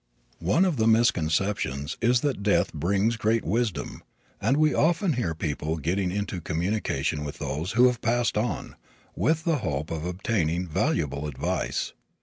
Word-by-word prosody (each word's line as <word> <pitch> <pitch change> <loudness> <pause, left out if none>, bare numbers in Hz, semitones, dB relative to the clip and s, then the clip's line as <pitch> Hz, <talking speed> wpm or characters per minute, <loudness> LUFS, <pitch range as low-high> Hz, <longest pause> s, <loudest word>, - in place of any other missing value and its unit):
One 100 - +3
of 175 -7 0
the 110 -1 +2
misconceptions 90 - +1
is 120 +1 +3
that 140 -8 -1
death 100 -4 +2
brings 100 +8 +1
great 110 +1 +1
wisdom, 110 +1 -1 0.4
and 125 +7 +2
we 155 0 +4
often 170 +3 +2
hear 115 -10 -1
of - - -16
people 80 0 -2
getting 90 +5 0
into 95 -1 -3
communication 80 -4 -1
with 75 - -6
those 80 +7 -3
who 120 +2 +6
have 125 -2 +2
passed 120 +1 +1
on, 105 -5 -2 0.4
with 160 0 +1
the 165 -2 +2
hope 75 - -3
of 80 -1 -3
obtaining 90 -2 -1
valuable 75 -2 -1
advice. 70 -2 -2
100 Hz, 155 wpm, -26 LUFS, 80-120 Hz, 0.4 s, who